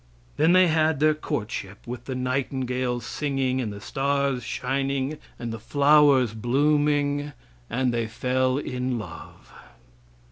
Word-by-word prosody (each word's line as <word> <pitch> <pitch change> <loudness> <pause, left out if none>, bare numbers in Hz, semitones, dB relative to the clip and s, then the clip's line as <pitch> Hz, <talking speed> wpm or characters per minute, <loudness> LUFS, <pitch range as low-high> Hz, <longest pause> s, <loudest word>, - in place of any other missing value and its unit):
Then 160 +3 +4
they 185 0 +7
had 160 -3 +2
their 155 +1 +4
courtship, 105 -9 -5
with 120 0 -7
the 130 - -4
nightingales 125 -1 -2
singing 135 -3 -1
and 110 -4 -3
the 100 - -8
stars 140 0 -1
shining 135 +4 -2 0.2
and 115 -1 -5
the 115 - -6
flowers 140 -1 +4
blooming, 145 +4 +1 0.4
and 125 -1 0
they 115 -1 -1
fell 130 +3 0
in 125 -3 -2
love. 85 -7 -10
130 Hz, 130 wpm, -25 LUFS, 125-145 Hz, 0.4 s, they